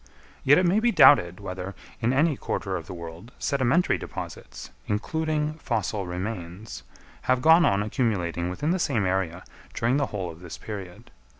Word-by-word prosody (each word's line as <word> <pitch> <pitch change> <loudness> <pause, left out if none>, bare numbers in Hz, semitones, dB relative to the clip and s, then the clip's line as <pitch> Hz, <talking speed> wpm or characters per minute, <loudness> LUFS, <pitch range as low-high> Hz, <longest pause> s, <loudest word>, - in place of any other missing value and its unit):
Yet 145 +2 +6
it 185 - +3
may 185 +5 +3
be 240 +2 +3
doubted 90 - +6
whether, 95 -1 -6 0.3
in 120 +1 +2
any 150 +3 +3
quarter 95 -6 -3
of 85 -4 -5
the - - -7
world, 85 +7 -9
sedimentary 140 +5 +1
deposits, - - -8 0.2
including 155 +7 -1
fossil 100 -8 -2
remains, 90 +2 -6 0.5
have 130 0 +4
gone 165 +2 +7
on 100 +1 +2
accumulating 95 -7 -1
within 145 - -1
the 185 - 0
same 125 - +1
area 90 -2 -1 0.3
during 120 +4 +1
the 145 - +1
whole 95 -4 -4
of 80 - -13
this 85 -2 -8
period. 105 +2 -8
105 Hz, 165 wpm, -26 LUFS, 90-145 Hz, 0.5 s, gone